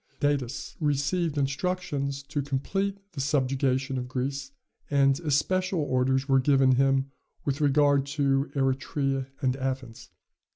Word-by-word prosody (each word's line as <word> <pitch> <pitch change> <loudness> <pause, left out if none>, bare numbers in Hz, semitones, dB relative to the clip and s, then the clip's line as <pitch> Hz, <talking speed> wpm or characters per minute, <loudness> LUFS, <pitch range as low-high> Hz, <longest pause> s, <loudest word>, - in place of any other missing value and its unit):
Datis 145 -4 -1
received 150 +2 0
instructions 140 -1 -1
to 145 +1 -3
complete 195 +9 -2
the 150 -7 -4
subjugation 135 -1 0
of 125 - -5
Greece, 135 - -3 0.4
and 140 -1 +3
especial 175 +4 +1
orders 130 -1 +1
were 135 -1 +4
given 135 -1 +4
him 135 +1 +2 0.3
with 140 +1 -1
regard 145 -1 +3
to 140 0 +2
Eretria 135 0 0 0.2
and 130 -1 +2
Athens. 130 -3 -4
140 Hz, 120 wpm, -27 LUFS, 135-145 Hz, 0.4 s, were